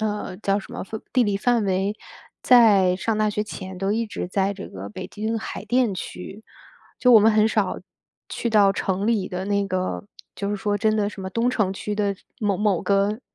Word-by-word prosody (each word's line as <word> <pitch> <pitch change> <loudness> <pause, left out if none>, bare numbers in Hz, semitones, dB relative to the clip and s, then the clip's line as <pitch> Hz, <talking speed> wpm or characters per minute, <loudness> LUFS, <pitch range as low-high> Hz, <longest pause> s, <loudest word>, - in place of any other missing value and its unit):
呃， 210 -3 -3
叫 200 0 0
什 - - -13
么 - - -5
范 220 +3 -7
地 250 -2 +4
理 205 -2 0
范 235 +1 +1
围， 195 +1 0 0.5
在 210 -7 +6
上 215 +3 -1
大 215 0 +2
学 210 0 -1
前 190 -3 -8
都 195 +2 -1
一 225 +2 0
直 190 - -5
在 195 +1 0
这 200 - -8
个 95 +1 -8
北 105 - -8
京 220 +2 -3
海 220 - -6
淀 245 -4 +2
区。 195 +3 -8 0.6
就 250 - +5
我 230 - +9
们 215 +1 +5
很 215 0 +4
少 210 -4 0 0.5
去 235 - -3
到 205 -3 +5
城 190 0 -2
里 215 -5 +1
的 185 +1 -4
那 200 0 0
个 185 +1 -2 0.3
就 200 - -3
是 205 - -1
说 205 +1 -1
真 215 -1 +2
的 205 -1 +1
什 195 - -10
么 190 - -4
东 235 +4 +1
城 210 -6 0
区 210 +2 -4
的 205 -1 0 0.3
某 205 -3 +1
某 205 -4 +1
个， 200 +3 +1
205 Hz, 230 characters per minute, -23 LUFS, 195-220 Hz, 0.6 s, 我